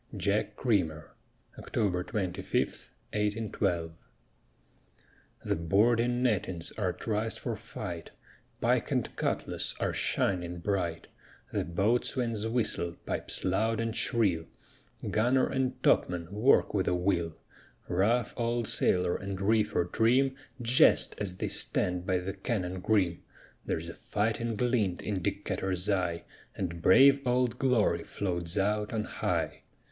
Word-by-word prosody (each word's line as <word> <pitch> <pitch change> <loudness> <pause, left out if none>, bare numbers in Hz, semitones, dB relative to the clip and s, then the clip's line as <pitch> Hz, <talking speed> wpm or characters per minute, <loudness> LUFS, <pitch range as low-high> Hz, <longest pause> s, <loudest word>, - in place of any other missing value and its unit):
JACK 100 +3 0
CREAMER 90 - 0 0.5
[October 90 -4 -1
25, 95 -2 -2 0.6
1812] 105 -5 -1 1.5
The - - +1
boarding 115 +9 +2
nettings 95 -7 0
are 95 -4 -1
triced 110 +4 -1
for - - -2
fight; - - -7 0.5
Pike - - +1
and - - -1
cutlass - - -1
are - - 0
shining 90 -2 0
bright; 85 -2 -2 0.5
The - - 0
boatswain's 110 +4 0
whistle 110 -7 0
pipes - - -2
loud 110 +4 +1
and 115 -1 -2
shrill; 95 -9 +1 0.6
Gunner 125 +4 +3
and 130 -1 -2
topman 85 -1 +2
work 115 +7 +4
with 95 -3 0
a 90 - +2
will; 90 -3 0 0.5
Rough 105 +6 +1
old 120 -1 -1
sailor 90 -1 +2
and 100 -1 -5
reefer 105 -3 +2
trim 125 +8 +2 0.2
Jest 120 +2 +4
as 90 -3 -2
they - - -2
stand 90 0 0
by 95 - +2
the 90 +2 -4
cannon 95 -3 -3
grim; 90 -3 +1 0.5
There's 80 +1 -2
a 80 - -6
fighting 115 +2 -1
glint 110 -6 0
in 100 -3 -2
Decatur's 95 -1 -2
eye, 90 -4 0 0.3
And 85 -3 -4
brave 135 +10 +7
Old 125 -2 +1
Glory 125 -5 +2
floats 85 -2 -2
out 105 +1 +1
on 110 -2 -1
high. - - -2
100 Hz, 120 wpm, -30 LUFS, 90-115 Hz, 1.5 s, brave